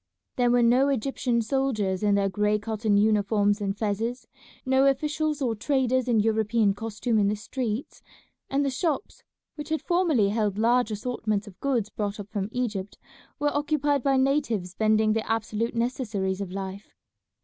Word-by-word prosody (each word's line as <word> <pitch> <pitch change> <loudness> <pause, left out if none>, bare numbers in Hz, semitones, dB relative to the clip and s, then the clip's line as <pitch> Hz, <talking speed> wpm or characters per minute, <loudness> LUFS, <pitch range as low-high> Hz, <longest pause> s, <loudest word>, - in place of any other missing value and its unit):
There 245 -1 +2
were 240 0 +4
no 250 +4 +4
Egyptian 250 -2 0
soldiers 220 -7 0
in 205 -1 +3
their 200 -1 +2
gray 210 +2 +1
cotton 215 0 0
uniforms 205 0 +2
and 200 0 -2
fezes, 225 +4 -2 0.4
no 265 +1 +4
officials 300 +2 0
or 240 -3 +1
traders 255 +2 0
in 235 -3 +3
European 220 -1 +2
costume 220 +2 -1
in 200 - +3
the 210 - +1
streets, 230 +2 -4 0.5
and 280 +1 +1
the 275 - 0
shops 305 +4 -2 0.3
which 295 0 -8
had 315 0 -1
formerly 340 - +2
held 210 -2 0
large 240 +2 +3
assortments 215 -1 -2
of 205 -4 -14
goods 240 -7 -1
brought 205 -1 -3
up 205 0 -8
from 200 -1 -2
Egypt 210 -6 -3 0.4
were 290 0 0
occupied 290 -1 +1
by 270 +1 +2
natives 260 -9 0
vending 215 +1 +2
the 225 0 -2
absolute 225 +1 -1
necessaries 220 -6 -1
of 190 -2 -5
life. 195 +1 -7
225 Hz, 160 wpm, -26 LUFS, 205-265 Hz, 0.5 s, were